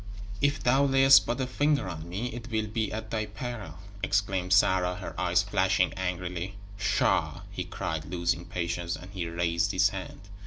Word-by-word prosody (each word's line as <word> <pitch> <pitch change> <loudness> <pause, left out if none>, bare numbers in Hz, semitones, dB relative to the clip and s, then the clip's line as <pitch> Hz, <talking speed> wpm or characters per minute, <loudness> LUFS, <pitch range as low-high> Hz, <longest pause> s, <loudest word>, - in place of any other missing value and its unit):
"If 145 0 +1
thou 135 +3 +4
layest 135 0 +6
but 120 +2 -1
a - - +1
finger 145 -1 +1
on 85 -2 -6
me, 110 +7 -3
it 120 +1 -7
will 110 -2 0
be 110 0 -2
at 110 0 -5
thy 110 -1 -1
peril," 105 - -6 0.2
exclaimed 95 -2 0
Sarah, 95 -2 +4
her - - -7
eyes - - +3
flashing - - +2
angrily. 90 +1 -3 0.2
"Pshaw!" 95 - +1
he - - -4
cried, 80 -1 -4
losing 85 0 -1
patience, 85 0 -2
and 90 +3 -11
he 90 -4 -3
raised 85 0 0
his - - +4
hand. - - -7
95 Hz, 170 wpm, -28 LUFS, 85-115 Hz, 0.2 s, layest